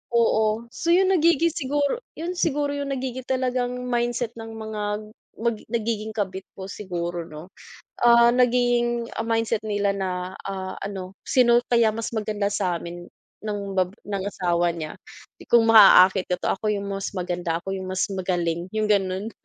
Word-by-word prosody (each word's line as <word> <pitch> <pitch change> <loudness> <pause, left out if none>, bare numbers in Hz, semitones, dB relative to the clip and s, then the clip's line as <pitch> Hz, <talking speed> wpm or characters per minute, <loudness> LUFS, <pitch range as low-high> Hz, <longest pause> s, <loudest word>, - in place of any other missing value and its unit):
Oo. 220 -1 +2
So 335 - -4
'yon, 380 +1 +4
nagiging 335 -2 +3
siguro 285 - -1 0.2
'yon 335 +3 -3
siguro 290 -2 +1
yung 285 -1 -3
nagiging 260 -1 -5
talagang 250 -1 -1
mindset 240 -1 -1
ng 225 - -7
mga, 220 -1 -5 0.6
mag 235 -1 +2
nagiging 220 -1 -2
kabit 190 -2 -3
po 190 - -7
siguro 175 -4 -4
'no. 155 +4 -11 0.5
Ah, 235 0 +6
naging 240 -1 +2 0.2
mindset 225 -1 0
nila 205 -1 0
na, 185 -1 -3
ah, 190 -1 -5
ano, 195 -1 -6
"Sino 240 -2 +4
kaya 235 -2 +4
mas 230 0 -4
maganda 210 -2 -1
sa'min 175 -2 -3 0.3
ng 210 -1 -3 0.2
bab 185 +1 +1
ng 200 -2 -3
asawa 175 -3 0
niya. 155 -2 -6 0.5
Kung 235 -1 +6
maaaakit 195 -3 +7
ko - - +3
'to, - - 0
ako 215 +2 -2
yung 200 0 -5
mas 195 0 -3
maganda, 175 -2 -2
ako 195 - -4
yung 190 -1 -6
mas 185 0 0
magaling", 175 -2 -2
yung 215 0 +1
gano'n. 195 +1 +1
215 Hz, 155 wpm, -24 LUFS, 185-240 Hz, 0.6 s, maaaakit